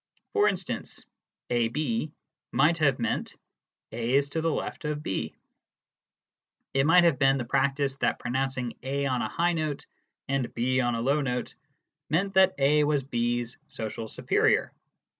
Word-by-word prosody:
For 420 Hz, -1 st, +4 dB
instance, -, -, -4 dB, 0.5 s
"AB" 120 Hz, +3 st, 0 dB, 0.4 s
might 155 Hz, +6 st, +3 dB
have 140 Hz, -4 st, +3 dB
meant 115 Hz, -, -2 dB, 0.6 s
"A 120 Hz, +3 st, -1 dB
is 140 Hz, 0 st, +3 dB
to 160 Hz, +3 st, -2 dB
the 165 Hz, -, +1 dB
left 160 Hz, -, -3 dB
of 150 Hz, 0 st, -3 dB
B." 95 Hz, -, -3 dB, 1.4 s
It 135 Hz, +1 st, +3 dB
might 175 Hz, +2 st, +7 dB
have 165 Hz, -6 st, +3 dB
been 135 Hz, -1 st, +4 dB
the 125 Hz, -, -3 dB
practice 135 Hz, +1 st, 0 dB
that -, -, +1 dB
pronouncing 130 Hz, -1 st, -2 dB
A 140 Hz, +2 st, -2 dB
on 130 Hz, -2 st, 0 dB
a -, -, -2 dB
high 175 Hz, +1 st, +1 dB
note 155 Hz, -3 st, -2 dB, 0.4 s
and 135 Hz, -3 st, -1 dB
B 130 Hz, +2 st, +1 dB
on 120 Hz, -1 st, 0 dB
a 115 Hz, -, -2 dB
low 140 Hz, +5 st, +2 dB
note 125 Hz, -3 st, -2 dB, 0.6 s
meant 195 Hz, +6 st, +1 dB
that 190 Hz, -1 st, +5 dB
A 145 Hz, +2 st, +4 dB
was 145 Hz, -2 st, +1 dB
B's 120 Hz, -2 st, -2 dB
social 110 Hz, 0 st, -5 dB
superior. -, -, +1 dB
135 Hz, 155 wpm, -27 LUFS, 120-150 Hz, 1.4 s, might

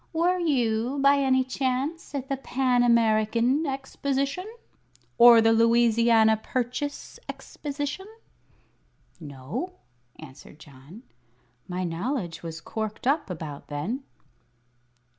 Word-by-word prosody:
"Were 350 Hz, +3 st, +1 dB
you, 250 Hz, -5 st, 0 dB
by 280 Hz, +1 st, +4 dB
any 260 Hz, -2 st, +2 dB
chance, 265 Hz, +4 st, -3 dB
at 270 Hz, -1 st, -4 dB
the 275 Hz, -, -1 dB
Pan 260 Hz, -2 st, 0 dB
American 235 Hz, +4 st, +2 dB
Exposition? 275 Hz, +5 st, -3 dB, 0.7 s
Or 235 Hz, -1 st, +9 dB
the 225 Hz, 0 st, +4 dB
Louisiana 230 Hz, -1 st, +4 dB
Purchase 255 Hz, +5 st, -4 dB
Exposition?" 290 Hz, +6 st, -6 dB, 1.1 s
"No," 145 Hz, -, -6 dB, 0.4 s
answered 145 Hz, -1 st, -13 dB
John. 150 Hz, -, -15 dB, 0.6 s
"My 180 Hz, 0 st, -3 dB
knowledge 175 Hz, -, -3 dB
was 165 Hz, -1 st, -7 dB
corked 220 Hz, +2 st, -5 dB
up 280 Hz, -3 st, +1 dB
about 155 Hz, -5 st, -7 dB
then." 155 Hz, -, -4 dB
240 Hz, 100 wpm, -26 LUFS, 215-275 Hz, 1.1 s, Or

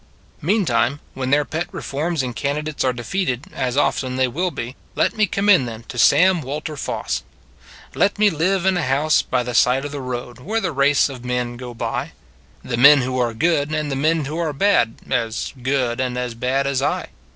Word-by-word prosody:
Meantime, 145 Hz, -, +1 dB
when 130 Hz, -1 st, -3 dB
their 145 Hz, +2 st, +3 dB
pet 160 Hz, +3 st, -3 dB
reforms 155 Hz, +1 st, -2 dB
and 125 Hz, -2 st, -4 dB
candidates 150 Hz, +2 st, -2 dB
are 130 Hz, -, +2 dB
defeated 125 Hz, +2 st, -2 dB
as 125 Hz, 0 st, -2 dB
often 130 Hz, -3 st, +1 dB
they 130 Hz, 0 st, +2 dB
will 175 Hz, +9 st, -1 dB
be 125 Hz, -5 st, -6 dB
< -, -, -33 dB
let -, -, +1 dB
me 215 Hz, -1 st, +2 dB
commend 195 Hz, -6 st, +3 dB, 0.2 s
to -, -, -8 dB
them 120 Hz, -, -5 dB
Sam 185 Hz, +4 st, +5 dB
Walter 150 Hz, +3 st, -5 dB
Foss: -, -, -3 dB, 0.7 s
Let 200 Hz, +1 st, +1 dB
me 210 Hz, -1 st, +4 dB
live 180 Hz, +4 st, 0 dB
in 190 Hz, -1 st, +3 dB
a -, -, 0 dB
house 150 Hz, +2 st, +2 dB
by -, -, -1 dB
the 120 Hz, 0 st, -5 dB
side 125 Hz, +3 st, +3 dB
of 145 Hz, -, -5 dB
the 145 Hz, -1 st, -5 dB
road, 125 Hz, -1 st, -5 dB
Where 215 Hz, -, -2 dB
the 180 Hz, -6 st, -2 dB
race 140 Hz, 0 st, +3 dB
of 130 Hz, -4 st, -9 dB
men 125 Hz, -1 st, -2 dB
go 125 Hz, -1 st, -8 dB
by -, -, -3 dB, 0.5 s
The 120 Hz, -, -3 dB
men 140 Hz, +3 st, +8 dB
who 130 Hz, 0 st, -2 dB
are 120 Hz, -2 st, 0 dB
good, 150 Hz, +1 st, +1 dB
and 150 Hz, -2 st, -2 dB
the -, -, -1 dB
men 155 Hz, +2 st, +1 dB
who 155 Hz, +4 st, -4 dB
are 160 Hz, -3 st, -1 dB
bad, 140 Hz, -, +2 dB
As 115 Hz, -2 st, -2 dB
good 125 Hz, -2 st, 0 dB
and 125 Hz, -1 st, -2 dB
as 125 Hz, -1 st, -3 dB
bad 130 Hz, +4 st, 0 dB
as 140 Hz, -1 st, 0 dB
I. 140 Hz, -, -1 dB
140 Hz, 205 wpm, -21 LUFS, 125-160 Hz, 0.7 s, men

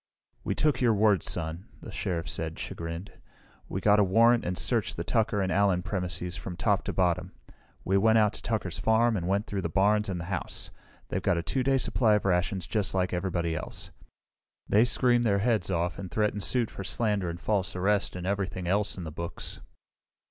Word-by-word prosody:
"We -, -, -1 dB
took 150 Hz, -4 st, +1 dB
your 115 Hz, -3 st, +4 dB
word, 105 Hz, -3 st, +3 dB
Son," 85 Hz, +2 st, -2 dB
the -, -, -9 dB
Sheriff 85 Hz, -3 st, -3 dB
said, 80 Hz, +2 st, -4 dB
chagrined. 85 Hz, +3 st, -6 dB, 0.6 s
"We 95 Hz, -, -3 dB
got 105 Hz, +1 st, +5 dB
a -, -, +6 dB
warrant 115 Hz, +5 st, +4 dB
and 90 Hz, +1 st, -3 dB
searched -, -, 0 dB
the -, -, -2 dB
Tucker 110 Hz, -3 st, +1 dB
and 95 Hz, -, -1 dB
Allen 95 Hz, -2 st, +2 dB
premises 90 Hz, -2 st, -3 dB
from 85 Hz, 0 st, -7 dB
top 100 Hz, -1 st, +1 dB
to -, -, -2 dB
bottom. 90 Hz, -3 st, 0 dB, 0.5 s
We 95 Hz, +1 st, +3 dB
went 110 Hz, +2 st, +4 dB
out 105 Hz, -1 st, +3 dB
to -, -, -8 dB
Tucker's 105 Hz, -6 st, -2 dB
farm 110 Hz, +1 st, +3 dB
and 90 Hz, -3 st, -2 dB
went 100 Hz, +3 st, +1 dB
through 100 Hz, -1 st, -3 dB
the 85 Hz, -, -2 dB
barns 105 Hz, +4 st, +2 dB
and 90 Hz, -2 st, -3 dB
the 85 Hz, -, -5 dB
house. 90 Hz, -2 st, -3 dB, 0.4 s
They've -, -, -2 dB
got -, -, +1 dB
a 85 Hz, -, -1 dB
2 130 Hz, -, -1 dB
day 135 Hz, +1 st, +2 dB
supply 115 Hz, -4 st, +3 dB
of 105 Hz, -, -1 dB
rations 90 Hz, 0 st, 0 dB
just 100 Hz, +1 st, -1 dB
like 90 Hz, -1 st, 0 dB
everybody 85 Hz, -2 st, -1 dB
else. 75 Hz, -, -6 dB, 0.8 s
"They 110 Hz, +3 st, +4 dB
screamed 120 Hz, -1 st, +2 dB
their 100 Hz, -4 st, +2 dB
heads 110 Hz, -3 st, +1 dB
off 85 Hz, -2 st, -1 dB
and 95 Hz, -2 st, -6 dB
threatened 105 Hz, +2 st, 0 dB
suit 120 Hz, -1 st, +1 dB
for 100 Hz, -, -7 dB
slander 105 Hz, -3 st, 0 dB
and 85 Hz, 0 st, -6 dB
false 95 Hz, -1 st, -1 dB
arrest 100 Hz, +2 st, +1 dB
and 90 Hz, -1 st, -5 dB
everything 95 Hz, -2 st, -2 dB
else 100 Hz, +2 st, 0 dB
in 90 Hz, -, -5 dB
the 80 Hz, -, -6 dB
books." 85 Hz, +2 st, -5 dB
95 Hz, 205 wpm, -28 LUFS, 90-105 Hz, 0.8 s, a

